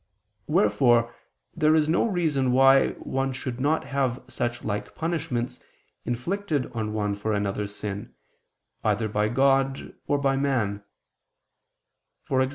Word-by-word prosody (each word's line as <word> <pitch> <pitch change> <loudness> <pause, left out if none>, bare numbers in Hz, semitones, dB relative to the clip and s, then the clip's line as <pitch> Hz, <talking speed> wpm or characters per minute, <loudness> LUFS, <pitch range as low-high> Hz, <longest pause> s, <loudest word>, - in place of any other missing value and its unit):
Wherefore 115 +2 +3 0.4
there 155 -2 +4
is 155 -1 +3
no 165 +8 +2
reason 155 - +1
why 135 +1 +5
one 135 0 -2
should 130 -1 -5
not 150 +4 +1
have 135 -3 -1
such 120 -2 -3
like 105 -1 -4
punishments 160 -7 -2 0.5
inflicted 150 +4 -2
on 110 -2 -3
one 105 -1 -1
for 105 +2 -2
another's 100 0 -2
sin, 105 -1 -6 0.7
either 110 +1 +1
by 105 0 0
God 135 +2 +1
or 145 - +2
by 135 -1 +1
man; 115 -8 0 1.5
e.g. 130 0 +3
130 Hz, 125 wpm, -26 LUFS, 110-140 Hz, 1.5 s, why